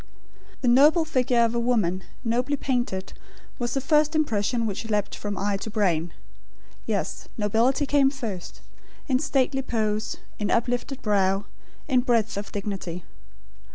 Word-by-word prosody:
The 255 Hz, -, 0 dB
noble 295 Hz, +7 st, +6 dB
figure 250 Hz, -5 st, +2 dB
of 230 Hz, -, -1 dB
a 235 Hz, -, 0 dB
woman, 210 Hz, -7 st, +1 dB, 0.2 s
nobly 250 Hz, +5 st, 0 dB
painted, 240 Hz, -9 st, -2 dB, 0.5 s
was 240 Hz, +1 st, -2 dB
the -, -, +2 dB
first 300 Hz, +3 st, +3 dB
impression 230 Hz, -5 st, +1 dB
which 220 Hz, +1 st, -4 dB
leapt 210 Hz, -1 st, 0 dB
from 205 Hz, -1 st, -4 dB
eye 200 Hz, 0 st, 0 dB
to 220 Hz, -, -6 dB
brain. 175 Hz, -6 st, +1 dB, 0.8 s
Yes, -, -, -2 dB
nobility 230 Hz, +7 st, +2 dB
came 275 Hz, -1 st, +4 dB
first, 225 Hz, -10 st, -6 dB, 0.5 s
in 260 Hz, -3 st, +2 dB
stately 270 Hz, -2 st, +1 dB
pose, 215 Hz, -4 st, -1 dB, 0.2 s
in 210 Hz, -, -1 dB
uplifted 245 Hz, +3 st, -1 dB
brow, 195 Hz, -1 st, +2 dB, 0.4 s
in 260 Hz, -4 st, +3 dB
breadth 230 Hz, -3 st, +1 dB
of 200 Hz, +1 st, -5 dB
dignity. 195 Hz, -4 st, -4 dB
230 Hz, 140 wpm, -25 LUFS, 205-265 Hz, 0.8 s, noble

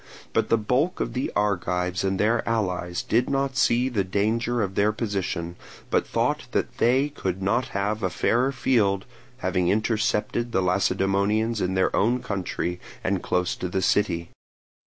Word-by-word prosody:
Now -, -, +4 dB
the 115 Hz, -, +1 dB
bulk 130 Hz, -, 0 dB
of -, -, -2 dB
the 130 Hz, -, -2 dB
Argives 90 Hz, -3 st, 0 dB
and 95 Hz, -1 st, 0 dB
their 115 Hz, +3 st, +3 dB
allies 90 Hz, -6 st, -1 dB
did 120 Hz, +3 st, +1 dB
not 135 Hz, -1 st, 0 dB
see 125 Hz, -1 st, +3 dB
the 115 Hz, -7 st, 0 dB
danger 110 Hz, +5 st, 0 dB
of 95 Hz, -1 st, -3 dB
their 105 Hz, +2 st, +3 dB
position, 95 Hz, -6 st, -3 dB, 0.3 s
but -, -, +2 dB
thought -, -, 0 dB
that -, -, -1 dB
they 130 Hz, +5 st, +3 dB
could 95 Hz, -10 st, -3 dB
not 115 Hz, +6 st, +1 dB
have 105 Hz, +2 st, -1 dB
a 95 Hz, -, +1 dB
fairer 125 Hz, +8 st, +1 dB
field, 105 Hz, -8 st, +1 dB, 0.4 s
having 90 Hz, -1 st, +1 dB
intercepted 110 Hz, +2 st, 0 dB
the 95 Hz, -, +2 dB
Lacedaemonians 100 Hz, +4 st, +1 dB
in 95 Hz, +1 st, 0 dB
their 95 Hz, -, +2 dB
own 120 Hz, +5 st, +2 dB
country 90 Hz, -3 st, -3 dB, 0.2 s
and 95 Hz, -1 st, 0 dB
close 90 Hz, 0 st, 0 dB
to 90 Hz, -, -3 dB
the 95 Hz, +1 st, -1 dB
city. 85 Hz, -5 st, +1 dB
105 Hz, 160 wpm, -25 LUFS, 95-115 Hz, 0.4 s, Now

